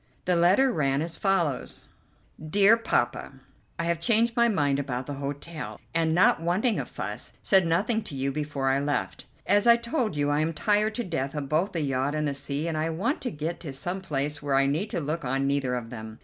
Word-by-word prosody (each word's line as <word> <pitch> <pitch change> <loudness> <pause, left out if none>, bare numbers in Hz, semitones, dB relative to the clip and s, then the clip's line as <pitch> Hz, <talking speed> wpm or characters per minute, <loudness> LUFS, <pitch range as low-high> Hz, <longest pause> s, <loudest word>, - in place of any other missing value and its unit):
The 180 - +2
letter 190 +11 +4
ran 140 - +1
as 165 0 -5
follows: 175 -9 0 0.6
"DEAR 200 +7 +5
POPPA: 230 - -1 0.4
"I 170 - -2
have 170 -1 0
changed 230 +5 +2
my 235 -1 +4
mind 145 -10 +1
about 130 -2 -3
the 145 - -5
hotel, 145 +3 -5
and, 165 -1 +2
not 180 -2 +4
wanting 190 +8 +1
a - - -4
fuss, - - -5
said 190 -3 +4
nothing 215 +7 +1
to 140 - -7
you 135 +1 -1
before 145 -2 -2
I 135 +1 +2
left. 145 +1 -2 0.2
As 205 +3 +3
I 235 - +9
told 235 - -2
you, 145 0 +1
I 145 - +2
am 160 +2 0
tired 210 +6 +1
to 240 - -2
death 155 - -3
of 140 -2 -4
both 170 +7 +1
the 165 - -1
yacht 135 +1 -1
and 150 0 0
the 140 - -1
sea, 140 +3 -3
and 160 -2 -2
I 160 +1 0
want 195 - -1
to 255 - -2
get 160 -1 -4
to 145 -5 -7
some 175 +8 -4
place 150 -3 -2
where 145 -2 0
I 135 0 +4
need 160 +10 -1
look 155 +1 -2
on 135 +2 0
neither 135 -2 0
of 115 -2 -5
them. 110 -2 -8
155 Hz, 220 wpm, -27 LUFS, 140-190 Hz, 0.6 s, I